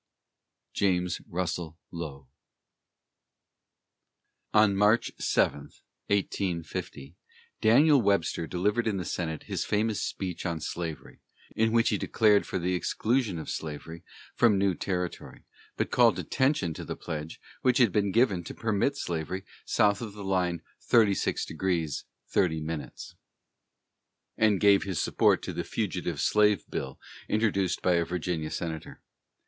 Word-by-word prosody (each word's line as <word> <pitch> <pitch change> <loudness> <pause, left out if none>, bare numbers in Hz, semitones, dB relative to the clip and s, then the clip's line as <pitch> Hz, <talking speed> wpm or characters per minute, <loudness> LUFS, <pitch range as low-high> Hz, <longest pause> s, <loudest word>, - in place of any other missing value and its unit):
JAMES 90 -2 0
RUSSELL 85 -2 -3
LOWELL. 75 -6 -7 2.2
On 105 -2 +5
March 105 +3 +3
7, 70 - +1 0.4
1850, 85 -7 -2 0.5
Daniel 140 +5 +6
Webster 100 -5 +1
delivered 105 +7 0
in 105 -3 0
the 90 - -3
Senate 80 -3 -3
his - - -3
famous 105 0 0
speech 90 -3 -4
on 85 -2 -2
slavery, 80 0 -6 0.3
in 110 0 +2
which 115 0 +3
he - - 0
declared 105 -2 +3
for - - -2
the 90 +1 -1
exclusion 110 +2 0
of 80 - -6
slavery 80 +2 -6 0.3
from 115 -4 +4
new 95 -1 +2
territory, 90 -1 -4 0.3
but - - -1
called - - +5
attention 130 - 0
to - - -7
the - - -5
pledge 75 0 -6 0.2
which 125 -1 +3
had 120 -7 +5
been 100 +1 +1
given 105 -5 +2
to - - -7
permit 115 +5 0
slavery 90 - -3 0.2
south 105 -2 +2
of 110 -4 -6
the 100 -1 -8
line 90 -3 0 0.2
of - - -24
36° 90 -6 0 0.3
30´, 80 -4 0 1.4
and 105 -3 +3
gave 100 -1 +5
his 95 -5 -3
support - - +2
to - - -4
the - - -3
fugitive - - -3
slave 105 -4 +3
bill 65 0 -4 0.3
introduced 100 -4 +1
by 90 - +3
a 85 -1 +3
Virginia 85 -2 -3
senator. 80 -2 -5
95 Hz, 130 wpm, -28 LUFS, 85-105 Hz, 2.2 s, Daniel